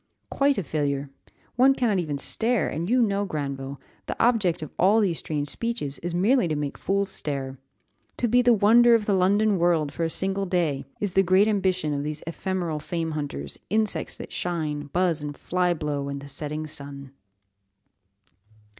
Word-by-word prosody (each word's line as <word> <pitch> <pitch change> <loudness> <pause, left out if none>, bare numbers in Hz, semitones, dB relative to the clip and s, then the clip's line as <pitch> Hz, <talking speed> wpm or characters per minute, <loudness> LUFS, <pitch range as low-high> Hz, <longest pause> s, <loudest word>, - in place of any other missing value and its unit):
Quite 280 0 +2
a 200 - -1
failure, 140 -3 -2 0.5
one 265 +2 +6
cannot 225 -7 +1
even 150 -5 -2
stare, 230 - +1
and 170 +4 -3
you 250 0 +4
know, 200 -2 +1
Granville, 140 -6 -4 0.3
the - - -4
object 195 -9 +2
of 155 - -8
all 200 +5 +5
these 185 -6 +1
strange 145 -2 -3
speeches 230 - -3
is 175 0 -4
merely 205 +3 +3
to 155 - -1
make 145 -1 -3
fools 200 0 -1
stare. 135 -5 -3 0.6
To 240 - +1
be 245 +2 +4
the 245 0 +4
wonder 230 +3 +6
of 220 -2 0
the 205 - +1
London 200 +2 +3
world 165 -4 +2
for 170 - -2
a 165 - +1
single 195 +3 -1
day, 170 -7 0
is 205 -3 -2
the 195 - +5
great 190 +3 +4
ambition 185 -7 0
of 140 - -1
these 150 +1 -4
ephemeral 170 -1 -3
fame 165 +1 -3
hunters 140 - -5
'insects 215 -1 -1
that - - -8
shine, 155 -4 -2
buzz, 175 -3 +1
and 145 -1 -6
fly 180 0 0
blow 145 -4 -2
in 140 - -4
the 140 0 -9
setting 150 +2 -4
sun. 140 -3 -7
175 Hz, 180 wpm, -25 LUFS, 145-205 Hz, 0.6 s, one